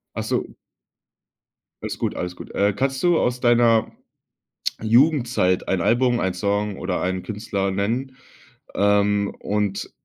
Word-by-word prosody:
Ach - - -2
so. - - -1 1.4
Alles - - -5
gut, - - -2
alles 90 0 -4
gut. - - -11
Äh, 100 +1 +2
kannst 135 +4 -1
du 175 -2 +4
aus 125 0 0
deiner 120 -2 +3 0.9
Jugendzeit 120 - +2
ein 95 - +1
Album, 120 +5 +2
ein 95 -1 -1
Song 100 +2 -1
oder 90 0 -2
einen 95 0 -2
Künstler 100 -2 -3
nennen, 120 +7 -2 0.6
ähm, 100 0 +2
und 105 -1 -2
105 Hz, 130 wpm, -22 LUFS, 100-120 Hz, 1.4 s, du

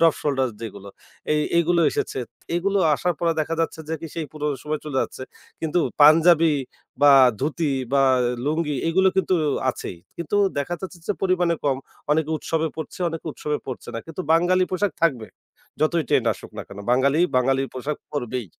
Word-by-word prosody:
Drop 165 -2 +5
shoulder 135 -3 0
যেগুলো 100 -3 -8 0.4
এই 150 - +2 0.2
এগুলো 170 +1 +3
এসেছে। - - -3 0.4
এগুলো 200 +3 +1 0.2
আসার 175 +3 -1
পর 170 - -1
দেখা 165 +2 -1
যাচ্ছে 160 0 -2
যে, 160 - -1
কি 165 - -6
সেই 160 -2 -3
পুরো 150 -1 -4 0.2
সময় 150 0 -3
চলে 145 -3 -4
যাচ্ছে। - - -7 0.4
কিন্তু 160 +2 0 0.2
পাঞ্জাবি, 160 +1 +6 0.5
বা 145 -1 +8 0.3
ধুতি, 150 +1 0 0.2
বা 140 -1 +4 0.4
লুঙ্গি 150 0 0
এগুলো 190 +3 +4
কিন্তু 190 -1 +2 0.4
আছেই 90 - -7 0.2
কিন্তু 170 +4 -2 0.2
দেখা 160 +5 -2
যাচ্ছে 185 -2 -7
যে, 205 - +1
পরিমাণে 180 -3 +2
কম। 135 -2 +2 0.3
অনেকে 155 +1 +1
উৎসবে 160 +1 -1
পড়ছে, 160 +3 -7
অনেকে 165 0 -7
উৎসবে 150 0 -3
পড়ছে 130 -2 -7
না। - - -2
কিন্তু 165 +3 -7
বাঙালি 180 +2 +3
পোশাক 185 +1 0
থাকবে 130 -10 +2 0.5
যতই 160 +1 +2
ট্রেন্ড - - +2
আসুক - - -12
না - - -4
কেনো 100 +1 -9
বাঙালি, 140 +5 +3 0.2
বাঙালির 135 +1 +2
পোশাক 140 +4 -3
পড়বেই। 125 -5 -3
155 Hz, 170 wpm, -23 LUFS, 140-170 Hz, 0.5 s, বা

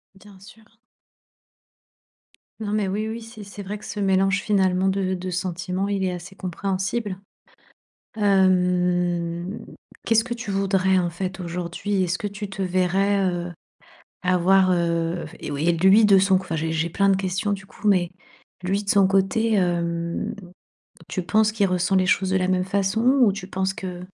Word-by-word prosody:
Bien 195 0 -16
sûr. 220 +3 -18 1.8
Non, 210 -1 -4
mais 210 -2 0
oui, 210 +3 -2
oui. 230 +1 -5
C'est 225 -2 -11
c'est 200 +1 -9
vrai 205 +2 -5
que - - -13
ce 210 - -6
mélange, 195 0 +2
finalement, 190 -2 +2
de 190 -1 0
de 185 0 -4
sentiments, 180 +2 -2
il 200 -1 -1
est 185 - 0
assez 180 +2 -8
compréhensible. 190 +2 -3 1.0
Hem, 180 -1 +1 0.4
qu'est-ce 225 0 +3
que 240 -1 -4
tu 230 -3 -6
voudrais 190 -1 +2
en 175 -1 0
fait, 185 +2 -5
aujourd'hui? 180 +3 -2
Est-ce 175 +1 -1
que 210 - -4
tu 205 0 -6
te 195 - -7
verrais, 190 +2 +1
heu, 175 -1 -2 0.7
avoir, 185 +1 +3
heu, 170 -1 0
f - - -14
et - - -6
oui 145 +4 -2
et 175 - +4
lui 190 +6 +5
de 200 -2 +6
son 190 0 +3
c - - -3
enfin 165 -3 -4
j'ai 160 +1 -1
plein 200 +4 +2
de 195 - +4
questions 195 +2 -1
du 195 -1 -7
coup, 210 +2 -6
mais 185 -3 +3 0.5
lui 195 +3 -1
de 200 - -6
son 195 -2 +5
côté, 195 +4 +1
hem, 170 -2 -1 0.7
tu 185 - -3
penses 215 +5 +2
qu'il 205 -3 +2
ressent 180 +1 0
les 185 -1 +3
choses 190 +1 +2
de 190 - +2
la 185 0 0
même 185 -1 +1
façon 200 +3 0 0.2
ou 210 -5 +5
tu 195 -2 -7
penses 190 0 -1
que, 180 -4 -6
190 Hz, 175 wpm, -23 LUFS, 180-200 Hz, 1.8 s, de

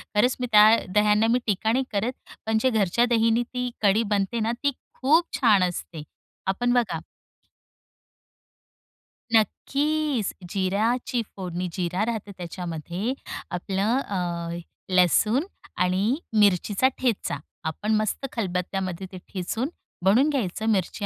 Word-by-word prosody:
खरंच 245 +5 +3
मी 250 - -1
त्या 210 0 +8 0.3
दह्यांना 210 +1 +4
मी 245 - +3
टीका 215 +1 +1
नाही 260 +3 +2
करत, 215 +4 0 0.3
पण 220 0 +1
जे 260 - +3
घरच्या 220 0 +2
दहीने 230 0 +3
ती 250 +1 -3
कढी 210 +2 +4
बनते 200 +4 -1
ना, 225 +1 0
ती 285 - +3 0.3
खूप 310 +6 +4
छान 210 -7 +4
असते,.आपण 180 +6 -3
बघा 245 -3 +1 2.3
नक्कीच. 280 +2 +1 0.2
जिऱ्याची 220 +6 0
फोडणी, 180 -1 -4
जिरा 180 +3 -1
राहते 220 -3 -4
त्याच्यामध्ये, 175 - -4 0.4
आपलं 195 +6 0
अ, 175 -7 -3 0.4
लसूण 210 - +4 0.3
आणि 190 +7 +2 0.2
मिरचीचा 205 +4 +3
ठेचा. 245 - 0 0.3
आपण 210 +7 -1
मस्त 215 +5 -1
खलबत्त्यामध्ये 185 -2 -3
ते 185 - -8 0.2
ठेचून 215 +8 -2 0.4
बनवून 240 +10 +5
घ्यायचं. 220 - -2
मिरची 205 0 0
210 Hz, 115 wpm, -25 LUFS, 185-240 Hz, 2.3 s, त्या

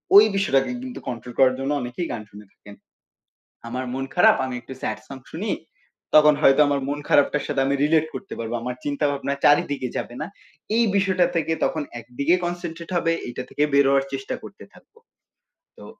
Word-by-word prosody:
ওই 205 +2 +10
বিষয়টাকে 165 - +2
কিন্তু 255 -1 -7
কন্ট্রোল 120 0 -6
করার 130 -1 +5
জন্য 135 +2 -2
অনেকেই 125 +8 -4
গান 110 - -4
শুনে 105 +1 -12
থাকেন। 105 0 -14 0.9
আমার 125 +2 -3
মন 135 0 -2
খারাপ - - +6
আমি 130 -1 -4
একটু 130 - -11
স্যাড - - -2
সং 135 - -8
শুনি 200 +7 -3 0.6
তখন 150 0 +7
হয়তো 135 0 +6
আমার 140 -1 +1
মন 145 +1 -2
খারাপটার 145 0 +3
সাথে 145 -2 -1
আমি 140 - +1
রিলেট 155 +1 +3
করতে 200 - -7
পারব 115 0 -4
আমার 125 +1 -4
চিন্তা 145 +1 -1
ভাবনা 140 0 -2
চারিদিকে 145 -3 +3
যাবে 120 - -4
না 150 - -3 0.5
এই 235 - +4
বিষয়টা 190 -3 +3
থেকে 165 0 0
তখন 155 - -1 0.2
একদিকে 125 +8 0
কনসেনট্রেট 175 -1 -5
হবে 165 -1 +2 0.2
এইটা 120 +1 -5
থেকে 145 - -2
বের 140 0 +6
হওয়ার 135 0 +3
চেষ্টা 135 0 -4
করতে - - -11
থাকব। - - -21 0.9
তো - - -11
140 Hz, 185 wpm, -23 LUFS, 130-165 Hz, 0.9 s, ওই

